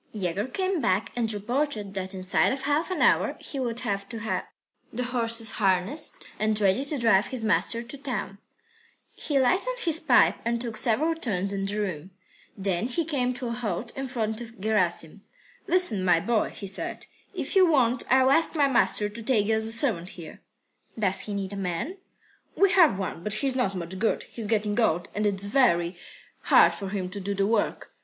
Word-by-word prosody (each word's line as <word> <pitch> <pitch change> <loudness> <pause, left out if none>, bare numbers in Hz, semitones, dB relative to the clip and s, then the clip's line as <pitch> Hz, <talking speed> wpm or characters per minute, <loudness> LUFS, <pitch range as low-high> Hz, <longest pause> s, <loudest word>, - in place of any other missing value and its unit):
III - - -5
Yegor 190 +5 -1
came 370 +4 -1
back 190 0 0
and 230 -2 0
reported 215 -1 -2
that 190 0 -5
inside 185 0 +1
of 270 0 -4
half 295 +5 0
an 370 - 0
hour - - +3
he 275 - -6
would 240 -2 -3
have 200 -4 -3
to 230 - -6
have 220 0 -3 0.4
the 250 +2 -3
horses 230 -2 -1
harnessed, 195 - 0
ready 215 +2 +2
to 285 +1 -2
drive 225 -4 +3
his 255 -4 -5
master 230 +2 +1
to 250 +4 -10
town. 240 -7 -5 0.7
He 290 - -2
lighted 375 - +1
his 325 -5 +1
pipe 285 -7 +4
and 235 0 -1
took 230 -2 -4
several 255 +8 +3
turns 200 - -2
in 195 0 -2
the 205 +2 -2
room. 185 -4 -4 0.5
Then 195 +2 -1
he 310 +6 -2
came 255 -5 -1
to 245 -1 -4
a - - -3
halt 230 -1 -4
in 270 0 -4
front 225 -3 -3
of 230 -1 -11
Gerasim. 190 -4 -1 0.5
"Listen, 335 - +4
my 175 -2 +4
boy," 225 +4 0
he 200 - -9
said, 190 0 -3 0.3
"if - - -4
you 375 -2 +6
want, 250 -6 +2
I'll 260 +1 +4
ask 325 +3 +3
my 290 -2 +3
master 235 -5 +3
to 210 +3 -8
take 220 -3 +1
you 220 - +1
as 220 0 +2
a - - +2
servant 225 -8 +1
here." 165 -3 -10 0.6
"Does 195 -4 +2
he 210 - -3
need 195 0 -4
a - - -5
man?" 195 - -3 0.6
"We 395 -1 +4
have 330 - +5
one, 185 -3 -4
but 210 +1 +1
he's 265 +2 0
not 200 -7 0
much 180 +1 -5
good. 225 - 0
He's 225 -3 -6
getting 210 0 0
old, 175 -6 +1
and 210 0 0
it's 200 -1 0
very 190 -7 +2 0.5
hard - - +6
for 195 -1 -6
him 190 -2 -3
to 200 - -3
do 200 +1 -3
the 195 0 +1
work. 215 0 -1
220 Hz, 200 wpm, -26 LUFS, 195-260 Hz, 0.7 s, you